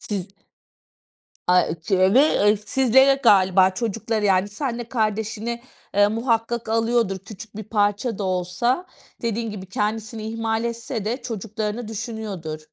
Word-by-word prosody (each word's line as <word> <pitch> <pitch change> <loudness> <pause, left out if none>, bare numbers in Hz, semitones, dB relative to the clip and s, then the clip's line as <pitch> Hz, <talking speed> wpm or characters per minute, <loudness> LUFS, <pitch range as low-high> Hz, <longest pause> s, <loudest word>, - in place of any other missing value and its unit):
Siz 195 -3 -4 1.2
Ay, 180 0 +5
ııı, 160 0 -5
çe 190 +2 +3
ve 260 - +7
eee, 210 +1 +4
sizlere 265 +5 +4
galiba 190 -3 +5
çocuklara 220 +1 -2
yani 190 0 +3
seninle 235 0 -4
kardeşine, 220 +1 -2 0.3
eee, 205 0 +6
muhakkak 230 +1 -1
alıyordur. 225 -3 +1
Küçük 205 +2 -11
bir 215 - -5
parça 205 +2 0
da 205 - -3
olsa, 190 - 0 0.4
dediğin 230 -1 -2
gibi 195 -2 -7
kendisini 215 +3 -3
ihmal 225 0 -1
etse 235 -2 -4
de, 245 +4 -2
çocuklarını 220 0 -4
düşünüyordur. 215 -8 -5
220 Hz, 130 wpm, -23 LUFS, 200-235 Hz, 1.2 s, ve